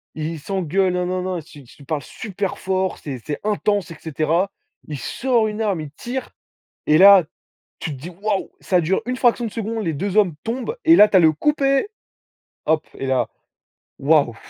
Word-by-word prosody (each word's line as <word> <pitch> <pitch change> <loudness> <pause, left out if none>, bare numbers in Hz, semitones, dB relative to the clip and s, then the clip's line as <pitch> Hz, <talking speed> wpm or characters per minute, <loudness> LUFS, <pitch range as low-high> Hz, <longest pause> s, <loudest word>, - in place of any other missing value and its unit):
ils 155 +1 -3
ils 160 - -7
s'engueulent, 190 +1 0
nin 180 0 0
nin 185 0 -2
nin, 185 -1 -2
s 155 -2 -11
s 135 -5 -15
ils 140 - -14
parlent 155 -2 -2
super 195 +6 -5
fort, 190 0 -1
c'est 135 -4 -6
c'est 145 - -4
intense, 205 -3 0
et 165 - -7
cetera. 165 +5 0 0.4
Il 150 - -5
sort 240 - 0
une 215 +1 -4
arme, 200 -7 0
il 150 - -8
tire, 245 - -5 0.6
et 155 - +5
là, 195 -1 +9 0.5
tu 155 - -4
te - - -6
dis: 170 +6 -7
«Waouh!» 210 -2 -1
Ca 180 -2 +2
dure 175 +4 +1
une 255 - -2
fraction 240 -1 +2
de 215 - -6
seconde, 225 -1 -3
les 165 - 0
2 195 +7 -3
hommes 195 -7 +4
tombent, 255 - -3
et 330 +1 +7
là, 210 - +9
tu 200 - +3
as 185 - +7
le: 160 -1 +5
«Coupez!», 275 - +1 0.8
hop 155 0 +1
et 135 - -4
là 130 -1 +1 0.7
waouh 140 -4 +3
185 Hz, 205 wpm, -21 LUFS, 155-215 Hz, 0.8 s, là